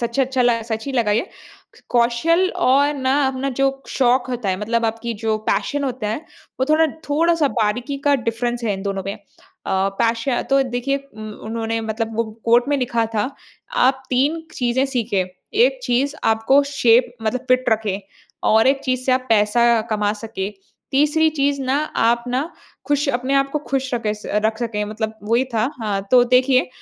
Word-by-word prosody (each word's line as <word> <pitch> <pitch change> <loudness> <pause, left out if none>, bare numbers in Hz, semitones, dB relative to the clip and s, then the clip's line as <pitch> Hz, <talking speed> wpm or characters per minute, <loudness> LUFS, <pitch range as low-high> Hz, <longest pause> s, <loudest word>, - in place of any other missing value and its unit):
सच्चे 235 +3 0
अच्छा 260 -1 0
ला 235 -1 +2
सच 220 -1 -4
ही 275 - -3
लगा 235 -5 +1
ये। 230 - +1 0.6
कौशल 245 +10 +2
और 285 -3 +3
ना 260 -1 0
अपना 265 +1 -2
जो 270 +1 +1 0.2
शौक 255 -1 +2
होता 240 -5 -3
है, 185 - +1
मतलब 230 +2 0
आपकी 230 +1 -3
जो 220 -1 +1
पैशन 285 -1 0
होता 245 -5 -3
है, 220 - -2 0.4
वो - - +4
थोड़ा 320 +1 +5 0.2
थोड़ा-सा 325 0 +2
बारीकी 245 +5 -1
का 285 - +4
डिफ़रेंस 240 -1 -2
है 210 - +1
इन 195 - -6
दोनों 195 -1 -3
में। 200 - -3
अ, - - -16 0.8
पैश 230 0 +1 0.3
तो 275 0 +4
देखिए 255 +2 -1
उ 275 -6 -16 0.3
उन्होंने 225 0 -2
मतलब 220 0 -3
वो 230 - +1 0.2
कोट 240 +3 +4
में 290 - +2
लिखा 235 -3 0
था, 215 +5 0 0.4
आप 265 +1 +2
3 285 +6 +1
चीज़ें 250 +2 +1
सीखें, 225 -8 -1 0.3
एक 260 +2 +3
चीज़ 265 +3 +1
आपको 225 +6 +4
शेप 240 -1 +4
मतलब 245 +4 -2
फिट 255 0 +3
रखें 215 -3 0 0.5
और 220 +2 +5
एक 270 0 +3
चीज़ 255 -1 0
से 255 - +4
आप 255 0 0
पैसा 225 +2 +3
कमा 210 -1 +1
सकें। 210 -2 -5 0.4
तीसरी 300 +3 +3
चीज़ 280 0 +1
ना 260 +1 +1 0.2
आप 235 +1 +2
ना 265 +7 -1 0.4
खुश 290 0 +1
अपने 255 +1 0
आपको 275 +2 +1
खुश 265 0 -1
रखें 220 -3 -1
स 210 - -13 0.2
रख 220 0 +1
सकें 215 -3 -2
मतलब 215 +1 -4
वही 235 +4 +2
था। 225 +5 +1
हाँ, 205 -2 -1
तो 250 -1 +6
देखिए 255 +1 +3
245 Hz, 180 wpm, -20 LUFS, 225-270 Hz, 0.8 s, तो